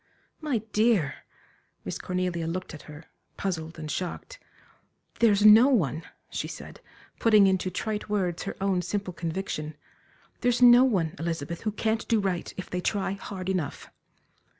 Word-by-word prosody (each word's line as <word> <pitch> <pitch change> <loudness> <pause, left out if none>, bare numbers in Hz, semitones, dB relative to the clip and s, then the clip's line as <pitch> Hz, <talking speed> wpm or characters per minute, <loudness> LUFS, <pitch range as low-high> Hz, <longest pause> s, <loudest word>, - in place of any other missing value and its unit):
"My 275 -9 -1
dear!" 210 -9 +1 0.6
Miss - - -4
Cornelia 180 -2 -2
looked 180 +2 -4
at 155 - -9
her, 150 +2 -11 0.3
puzzled 165 -4 -3
and 155 -1 -5
shocked. 185 - -5 0.8
"There's 210 -3 +4
no 220 +4 +9
one," 170 - +1 0.3
she - - -3
said, - - -10 0.4
putting 215 -3 +6
into 190 -1 +1
trite 210 +4 -4
words 180 -5 -1
her - - -5
own 190 -2 +1
simple 195 0 -3
conviction 165 -3 -4 0.6
"there's 245 0 +1
no 245 0 +8
one, 185 -11 +1
Elizabeth, 165 0 -3
who 215 - -1
can't 220 +1 -1
do 225 -2 +3
right, 190 -3 -2
if 185 - -5
they 180 - -3
try 200 0 -1
hard 195 -1 -6
enough." 185 -7 -3
190 Hz, 150 wpm, -27 LUFS, 170-215 Hz, 0.8 s, no